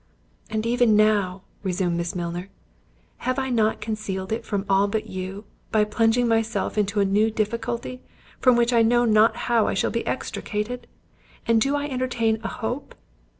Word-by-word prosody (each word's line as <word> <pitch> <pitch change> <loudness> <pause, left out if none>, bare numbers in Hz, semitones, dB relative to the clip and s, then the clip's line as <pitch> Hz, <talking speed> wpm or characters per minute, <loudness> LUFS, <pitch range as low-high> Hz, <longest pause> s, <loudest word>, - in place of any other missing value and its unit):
"And 220 0 -2
even 240 -2 +3
now," 205 -3 +2 0.2
resumed 180 -2 -1
Miss 170 +2 -3
Milner, 175 +2 -4 0.7
"have 255 +1 -2
I 265 -1 -1
not 220 -3 +1
concealed 215 -3 -4
it 225 - -2
from 200 -2 -2
all 195 +1 +3
but 215 +1 -2
you, 190 0 -6 0.3
by 215 -1 +4
plunging 225 +3 +2
myself 225 -2 0
into 205 -1 +1
a - - +3
new 205 +3 +3
difficulty, 230 +3 -3 0.4
from 255 -2 +5
which 240 +1 +2
I 230 - +5
know 240 +2 +4
not 215 0 +4
how 235 -2 +3
I - - 0
shall - - +1
be - - -3
extricated? 235 +4 -3 0.6
And 230 -1 +3
do 275 +4 +2
I 290 0 -1
entertain 250 -5 0
a 230 - -3
hope? 240 +5 -5
220 Hz, 170 wpm, -24 LUFS, 200-235 Hz, 0.7 s, from